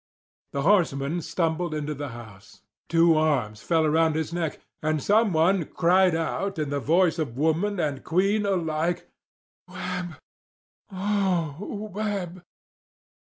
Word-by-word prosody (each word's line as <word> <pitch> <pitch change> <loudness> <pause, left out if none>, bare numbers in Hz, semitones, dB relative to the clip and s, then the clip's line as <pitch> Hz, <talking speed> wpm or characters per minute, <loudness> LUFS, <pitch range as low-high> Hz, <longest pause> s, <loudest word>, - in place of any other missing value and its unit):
The 140 - -1
horseman 165 -4 +2
stumbled 165 0 -1
into 150 0 -3
the 145 0 -5
house. 110 -5 -13 0.3
Two 165 0 +5
arms 130 -9 0
fell 165 -2 +2
around 160 +1 +3
his 160 +1 -2
neck, 170 -3 -2 0.2
and 155 0 +1
someone 190 -2 +3
cried 180 +2 +3
out 195 +4 -2
in 150 -2 -2
the 145 - 0
voice 165 +3 +2
of 135 -6 -3
woman 165 +7 +1
and 145 -5 -2
queen 195 +5 +1
alike: 170 -2 -1 0.6
"Webb— 180 -2 -5 0.7
oh, 195 0 -1
Webb!" 195 -4 -3
165 Hz, 120 wpm, -25 LUFS, 155-185 Hz, 0.7 s, Two